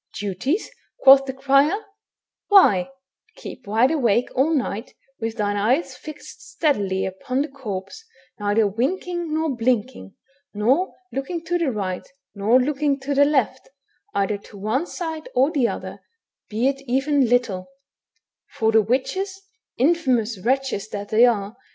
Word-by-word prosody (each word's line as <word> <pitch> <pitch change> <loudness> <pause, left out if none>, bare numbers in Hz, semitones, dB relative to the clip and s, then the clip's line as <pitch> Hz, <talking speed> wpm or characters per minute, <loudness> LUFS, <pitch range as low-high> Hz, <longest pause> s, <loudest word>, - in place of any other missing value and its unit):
"Duties!" 210 - -2 0.3
quoth 270 0 +8
the 265 - -4
crier; 275 +6 +3 0.7
"why, 240 - +5 0.5
keep 250 - -10
wide 225 +6 +3
awake 245 -6 +2
all 275 +5 +2
night, 245 -6 -2 0.2
with 225 0 -4
thine 205 -1 0
eyes 250 +11 +1
fixed 310 +3 -11
steadily 205 - 0
upon 255 +8 -2
the - - -5
corpse, 245 - -7 0.4
neither 205 +1 +2
winking 335 - -2
nor 315 -3 0
hlinking, 225 - -1 0.4
nor 260 - +1 0.2
looking 325 +5 -4
to 350 +1 0
the 320 -6 +1
right 190 -5 -4 0.3
nor 220 +5 +3
looking 280 +1 0
to 280 +1 -2
the 285 +1 +5
left, 265 -3 0 0.5
either 200 +1 0
to 205 - -14
one 220 - -1
side 320 -3 -5
or 265 +4 +3
the 265 -6 +2
other, - - -6 0.5
be 225 +4 0
it 275 0 -1
even 270 0 +2
little; 225 -7 +1 0.8
for 220 0 0
the 220 0 +5
witches, 375 - -2 0.4
infEunous 250 - +1
wretches 260 -4 0
that 205 0 -6
they 225 +3 +6
are 210 -2 -1
255 Hz, 140 wpm, -22 LUFS, 210-290 Hz, 0.8 s, quoth